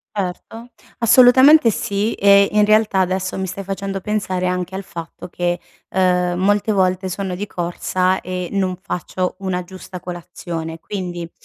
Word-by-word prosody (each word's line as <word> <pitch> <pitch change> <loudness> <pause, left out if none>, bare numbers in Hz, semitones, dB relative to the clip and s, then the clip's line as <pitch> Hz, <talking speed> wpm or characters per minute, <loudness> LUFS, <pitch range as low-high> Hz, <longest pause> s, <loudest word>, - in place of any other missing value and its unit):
Certo. 210 +5 -5 0.3
Assolutamente 255 +4 +7
sì 205 +1 -1
e 200 0 +5
in 210 0 +4
realtà 215 -2 +3
adesso 185 0 -1
mi 190 - -2
stai 195 +2 -6
facendo 195 0 -4
pensare 190 -3 -1
anche 180 0 -2
al 195 - -4
fatto 170 -3 -9
che, 175 0 -1 0.3
uhm, 180 -1 +2
molte 205 +2 +2
volte 185 -1 +1
sono 185 0 -3
di 200 +3 -4
corsa 185 +1 -1
e 180 -1 -5
non 190 -2 0
faccio 185 -1 -3
una 185 -2 -2
giusta 185 0 -10
colazione, 170 -2 -6
quindi 175 -3 -6
190 Hz, 145 wpm, -19 LUFS, 180-200 Hz, 0.3 s, Assolutamente